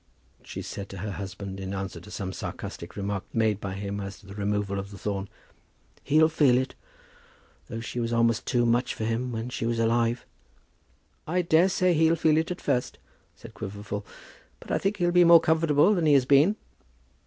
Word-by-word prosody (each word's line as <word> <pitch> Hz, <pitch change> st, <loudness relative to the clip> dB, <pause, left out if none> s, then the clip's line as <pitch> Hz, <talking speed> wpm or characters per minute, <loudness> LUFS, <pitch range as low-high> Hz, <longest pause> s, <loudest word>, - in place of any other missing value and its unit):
she -, -, -7 dB
said 100 Hz, -1 st, -7 dB
to 95 Hz, -, -8 dB
her 105 Hz, +3 st, -4 dB
husband, 95 Hz, 0 st, -6 dB
in 95 Hz, 0 st, -4 dB
answer 95 Hz, -3 st, -5 dB
to 90 Hz, -, -13 dB
some 95 Hz, -3 st, -5 dB
sarcastic 85 Hz, -1 st, -7 dB
remark 100 Hz, -1 st, -3 dB
made 110 Hz, -3 st, +1 dB
by 95 Hz, -1 st, -4 dB
him 100 Hz, +1 st, -4 dB
as 100 Hz, 0 st, -6 dB
to -, -, -19 dB
the 100 Hz, -, -10 dB
removal 100 Hz, -1 st, -1 dB
of 100 Hz, 0 st, -6 dB
the 100 Hz, -, -10 dB
thorn. 100 Hz, -1 st, -3 dB, 0.7 s
"He'll 155 Hz, +2 st, +4 dB
feel 145 Hz, -6 st, +3 dB
it, 130 Hz, +1 st, -1 dB, 0.9 s
though 115 Hz, -, -5 dB
she 120 Hz, +1 st, -5 dB
was 115 Hz, -1 st, -1 dB
almost 115 Hz, 0 st, +1 dB
too 120 Hz, -1 st, +2 dB
many 120 Hz, +2 st, +2 dB
for -, -, -4 dB
him 115 Hz, +3 st, -1 dB
while 115 Hz, +1 st, -4 dB
she 115 Hz, -2 st, -3 dB
was 115 Hz, 0 st, 0 dB
alive." 115 Hz, +1 st, +1 dB, 1.0 s
"I 180 Hz, +3 st, +1 dB
daresay 180 Hz, +2 st, +3 dB
he'll 160 Hz, +1 st, +4 dB
feel 155 Hz, -2 st, +3 dB
it 160 Hz, +1 st, 0 dB
at 180 Hz, -, -5 dB
first," 125 Hz, -3 st, -1 dB, 0.4 s
said -, -, -13 dB
Quiverful; 105 Hz, +1 st, -6 dB, 0.6 s
"but -, -, -10 dB
I -, -, +1 dB
think 195 Hz, +2 st, -1 dB
he'll 175 Hz, -2 st, +1 dB
be 180 Hz, 0 st, +6 dB
more 170 Hz, -1 st, +8 dB
comfortable 160 Hz, +3 st, +3 dB
than 170 Hz, -5 st, +1 dB
he 150 Hz, -, +5 dB
has 135 Hz, -2 st, +4 dB
been." 145 Hz, +9 st, +5 dB
115 Hz, 195 wpm, -27 LUFS, 100-155 Hz, 1.0 s, more